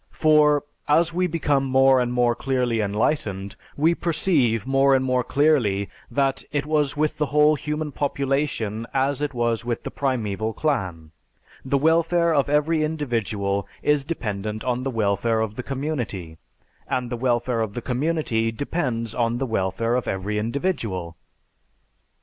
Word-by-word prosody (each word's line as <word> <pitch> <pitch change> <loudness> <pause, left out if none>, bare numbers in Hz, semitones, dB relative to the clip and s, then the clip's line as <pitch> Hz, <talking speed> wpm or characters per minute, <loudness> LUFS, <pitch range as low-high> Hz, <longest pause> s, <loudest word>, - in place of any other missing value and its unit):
For, 150 -2 +4 0.2
as 165 +3 +3
we 180 +1 +1
become 150 -5 +1
more 135 0 +4
and 120 -1 -1
more 120 -1 +2
clearly 125 -2 0
enlightened, 100 -2 -1 0.2
we 160 +4 +4
perceive 150 - +1
more 135 0 +4
and 130 0 +1
more 125 -1 +1
clearly 120 -10 +2 0.2
that 135 -1 0
it 145 -1 -1
was 150 -2 0
with 155 0 0
the 150 - +1
whole 150 +1 +4
human 150 +1 -3
population 135 -6 -1
as 135 +1 +1
it 145 -3 -2
was 120 -1 0
with 120 -1 -3
the - - -5
primeval 110 -5 -2
clan; 95 - -2 0.5
the 135 +1 +1
welfare 165 +3 +3
of 140 -2 +2
every 150 +2 +2
individual 110 -10 -1 0.2
is 150 -1 +2
dependent 110 -8 -4
on 125 -1 -1
the 135 - -2
welfare 110 -1 +1
of 110 -2 -1
the 125 - -5
community, 125 - -4 0.5
and 125 -1 -2
the - - -1
welfare 120 -1 0
of 110 -2 -2
the 120 - -3
community 125 -4 0
depends 115 -4 -2
on 115 0 0
the 135 - -1
welfare 110 +1 -1
of 125 0 0
every 100 +3 -2
individual." 110 - -2
130 Hz, 150 wpm, -23 LUFS, 110-150 Hz, 0.5 s, For